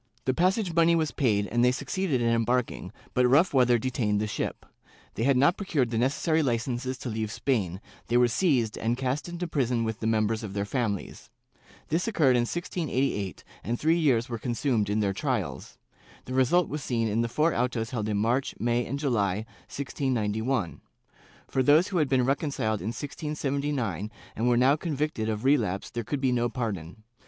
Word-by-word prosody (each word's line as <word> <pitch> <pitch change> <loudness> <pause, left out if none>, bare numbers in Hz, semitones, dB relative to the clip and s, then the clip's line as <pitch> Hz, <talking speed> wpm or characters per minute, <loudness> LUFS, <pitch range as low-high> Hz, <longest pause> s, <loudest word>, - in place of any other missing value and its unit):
The 130 - +2
passage 185 - +1
money 170 0 +4
was 160 -2 0
paid 105 -7 +1
and 120 +3 +1
they 125 - +5
succeeded 140 +1 -1
in 115 - +2
embarking, 115 -4 0 0.2
but 125 0 +4
rough 150 +8 +4
weather 125 -2 +4
detained 110 -4 0
the 105 - 0
ship; 105 - -4 0.5
they - - -5
had 135 +2 +3
not 145 +7 +4
procured 150 - 0
the 115 - 0
necessary 155 +6 +1
Ucences 125 0 -1
to 125 - -4
leave 110 -1 -3
Spain, 100 -8 -1 0.3
they 120 - +2
were 125 0 +5
seized 120 - +1
and 115 +2 0
cast 130 +5 -2
into 175 +1 -4
prison 125 -7 0
with 110 0 -3
the 110 - -2
members 110 0 +1
of 105 -3 -6
their 100 0 -1
families. 105 -3 -3 0.6
This 165 +7 0
occurred 150 - +3
in. 120 -1 +1
1688 140 - -2 0.2
and 120 +1 -2
three 165 +2 +3
years 125 -7 +2
were 115 -2 -4
consumed 120 -3 0
in 105 +1 +1
their 100 -2 +1
trials. - - -3 0.5
The 130 - -6
result 130 +7 +3
was 150 +1 -4
seen 115 -2 0
in 110 +2 +1
the 115 - -1
four 155 +7 +2
autos 120 -2 -1
held 110 -4 -2
in 105 - 0
March, 120 +6 0
May 120 +1 +1
and 140 - -3
July, 110 -8 0 0.2
1691. 120 - -2 0.7
For 130 - 0
those 150 +8 +5
who 190 - -1
had 150 -3 +1
been 130 -2 +3
reconciled 135 - -1
in 95 - -4
1679 140 - -3 0.3
and 115 +3 +1
were 120 - +3
now 130 +4 +5
convicted 150 -8 -2
of 110 +2 -3
relapse 110 -9 +1
there 120 0 -3
could 140 +5 -3
be 130 -2 +2
no 120 -1 +1
pardon. 110 -5 -5
125 Hz, 185 wpm, -27 LUFS, 110-145 Hz, 0.7 s, they